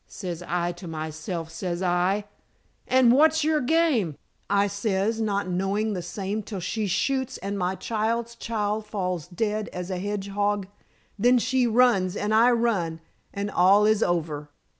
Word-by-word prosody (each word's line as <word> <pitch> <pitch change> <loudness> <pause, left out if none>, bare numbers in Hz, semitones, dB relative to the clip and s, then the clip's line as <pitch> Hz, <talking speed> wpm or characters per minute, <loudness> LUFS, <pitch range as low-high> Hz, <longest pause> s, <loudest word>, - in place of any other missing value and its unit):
Says 175 -4 -6
I 175 0 0
to 175 - -9
myself, 160 +1 -5
says 175 +1 -3
I, 185 +3 +1 0.6
'And 255 -2 +5
what's 315 +4 +4
your 305 0 +2
game?' 255 - +2 0.3
I 200 0 +3
says, 200 +2 -1
not 200 -3 0
knowing 195 +4 0
the 180 - -3
same 195 +4 -4
till 200 -1 -6
she 205 +4 -2
shoots 260 +7 0
and 200 +2 -4
my 185 -1 -1
child's 230 +3 -2
child 215 -2 -2
falls 180 -6 -3
dead 210 +3 -2
as 180 +1 -5
a 185 - -2
hedgehog. 205 0 -1 0.5
Then 245 +4 +5
she 255 +1 +2
runs 225 -6 +3
and 210 +1 -1
I 230 +3 +6
run, 215 -9 0 0.3
and 200 +1 -3
all 195 +4 +5
is 215 0 +3
over." 155 -5 -1
205 Hz, 155 wpm, -25 LUFS, 180-225 Hz, 0.6 s, I